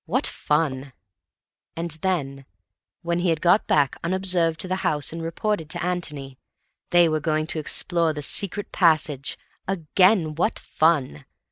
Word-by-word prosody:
What - - 0
fun! 140 -3 -1 0.8
And 170 0 -4
then, 140 -8 -2 0.6
when 170 0 -1
he 175 0 +1
had 165 -2 +1
got 180 +6 +3
back 145 -3 +2
unobserved 175 -2 +1
to - - 0
the 185 0 -1
house 150 -4 -1
and 165 - -5
reported 165 0 -2
to - - -4
Antony, 150 -7 -4 0.5
they 175 -1 +5
were 155 -1 0
going 155 0 0
to 160 - -2
explore 165 +2 +1
the 150 -1 -6
secret 200 +6 -2
passage! 155 -5 +1 0.3
Again, 185 -1 +2
what 180 +8 0
fun! 145 - 0
165 Hz, 145 wpm, -24 LUFS, 150-180 Hz, 0.8 s, they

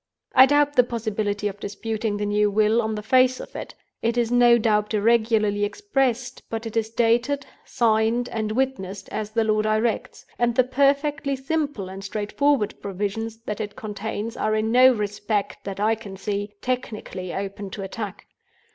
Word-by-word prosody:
"I 260 +1 +8
doubt 290 +1 +3
the 250 - +7
possibility 215 -3 -2
of 205 0 -6
disputing 215 +1 -3
the 205 - -2
new 210 0 +2
Will 215 +3 +3
on 220 -1 -2
the 210 - -5
face 255 +3 +4
of - - -10
it. - - -7 0.3
It 230 +1 0
is 235 -1 +1
no 240 -1 +6
doubt 210 -1 +1
irregularly 215 -1 +2
expressed; 255 - -1
but 225 0 -4
it 225 - -6
is 220 -1 0
dated, 240 +5 +1 0.2
signed, 225 +1 +2
and 215 -1 -2
witnessed 220 -7 -2
as 215 -1 -4
the 225 +1 +1
law 215 -1 +2
directs; 215 +1 -1
and 240 -1 +2
the 255 - +5
perfectly 280 +2 +1
simple 280 -6 -2
and 190 +1 -8
straightforward 210 +5 0
provisions 205 +3 -3
that 215 -2 -4
it 210 -1 -5
contains 215 +1 -5
are 215 0 0
in 215 +1 0
no 255 +2 +7
respect, 210 -2 -2
that 195 0 -5
I 215 +2 +3
can 205 -3 -8
see, 205 +1 -3
technically 215 -7 -4
open 200 +1 -5
to 195 +1 -6
attack. 205 0 -6
220 Hz, 170 wpm, -24 LUFS, 205-245 Hz, 0.3 s, I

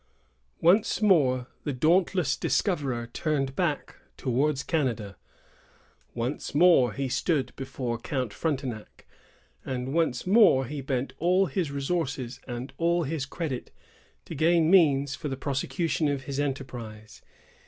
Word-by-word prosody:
Once 180 +2 +4
more 140 - +3 0.2
the 145 - -2
dauntless 165 +2 +2
discoverer 140 - 0
turned 140 -4 -1
back 155 -4 -2 0.2
towards 135 +3 0
Canada. 120 -10 -1 1.0
Once 120 +5 -3
more 155 -7 +5
he 135 0 -2
stood 135 +2 0
before 130 -3 -4
Count 125 -3 -3
Frontenac, 130 -8 -4 0.6
and 130 0 -4
once 160 -7 0
more 185 - +5
bent 130 0 -2
all 180 +3 +3
his 180 -4 -2
resources 140 -3 -3
and 125 +1 -6
all 170 +1 +2
his 145 -2 -3
credit 140 -4 -4 0.6
to - - -7
gain 165 +2 +3
means 145 -7 +4
for 155 - -5
the 135 -2 -4
prosecution 150 +4 -1
of 140 -2 -1
his 140 0 -4
enterprise. 120 -6 -5
140 Hz, 120 wpm, -27 LUFS, 130-165 Hz, 1.0 s, more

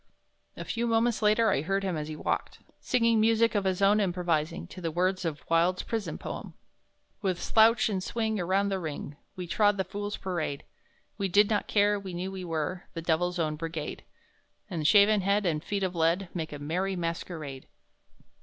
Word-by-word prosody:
A - - -6
few 235 0 -1
moments 230 0 +2
later 215 +1 +4
I 140 - +1
heard 195 +5 -1
him 185 -3 -1
as 150 -1 -3
he 155 - -5
walked, - - -2 0.2
singing 230 -3 +2
music 225 +1 +3
of 205 -2 0
his 190 +1 0
own 205 +2 +5
improvising 175 -4 0
to 185 - -9
the 165 - -1
words 185 +3 0
of 155 -2 -4
Wilde's 170 +2 +2
prison 225 -2 -3
poem: - - -7 0.7
"With 185 -4 -1
slouch 225 +1 +4
and 195 -4 -1
swing 220 +1 -1
around 190 +3 +1
the 195 -1 -1
ring, 150 -3 -5 0.2
We 180 - -5
trod 205 +3 +2
the 190 - +1
Fools' 205 +2 -5
Parade! 165 -7 -3 0.6
We 195 - +1
did 200 +3 +4
not 210 - 0
care; 205 0 +3
we 190 -3 -7
knew 185 +2 -3
we 190 -1 -6
were 165 +1 -3
The 165 - -4
Devil's 175 +2 +1
Own 155 -2 0
Brigade; 160 -1 -5 0.7
And 160 -4 0
shaven 205 +3 +6
head 200 +2 +1
and 155 -3 0
feet 200 +1 -2
of 185 -1 -1
lead 170 +2 +1
Make 160 -3 -4
a 145 - -5
merry 180 +7 -2
masquerade." 165 -5 -5
185 Hz, 190 wpm, -28 LUFS, 165-205 Hz, 0.7 s, shaven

